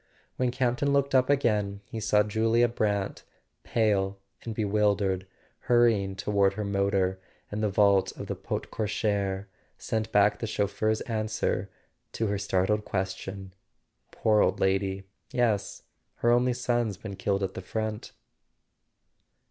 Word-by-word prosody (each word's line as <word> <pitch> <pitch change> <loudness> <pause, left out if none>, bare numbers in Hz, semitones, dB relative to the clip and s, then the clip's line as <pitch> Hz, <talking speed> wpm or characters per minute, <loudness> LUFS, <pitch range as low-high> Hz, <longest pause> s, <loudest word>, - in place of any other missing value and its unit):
When 125 -1 +1
Campton 125 +2 0
looked 140 -1 +1
up 130 0 +4
again 105 -8 +1
he 110 - -6
saw 105 -1 +3
Julia 115 +3 +2
Brant, 105 -4 -1 0.4
pale 100 -4 +1 0.2
and 115 -2 -6
bewildered, 100 -3 +1 0.4
hurrying 115 -5 +3
toward 100 0 +2
her 105 +1 -3
motor, 100 -1 +1 0.3
and 105 +1 -3
the 105 - +1
vault 100 -1 +3
of - - -5
the - - -3
porte - - -5
cochere 100 -2 -1 0.3
sent 110 0 -3
back 105 0 +4
the 115 - -3
chauf¬ 100 -2 -1
feur's 110 0 0
answer 110 -4 -2 0.4
to 115 - -1
her 100 -1 -1
startled 100 +3 +1
question: 95 0 -4 0.6
"Poor 105 -1 +2
old 95 - +2
lady— 95 0 0 0.3
yes, 110 -5 0 0.3
her 120 - +2
only 125 +1 +3
son's 120 -4 -1
been 100 0 -7
killed 100 0 -1
at 95 0 -2
the - - -6
front." 110 +2 -4
105 Hz, 140 wpm, -28 LUFS, 100-115 Hz, 0.6 s, up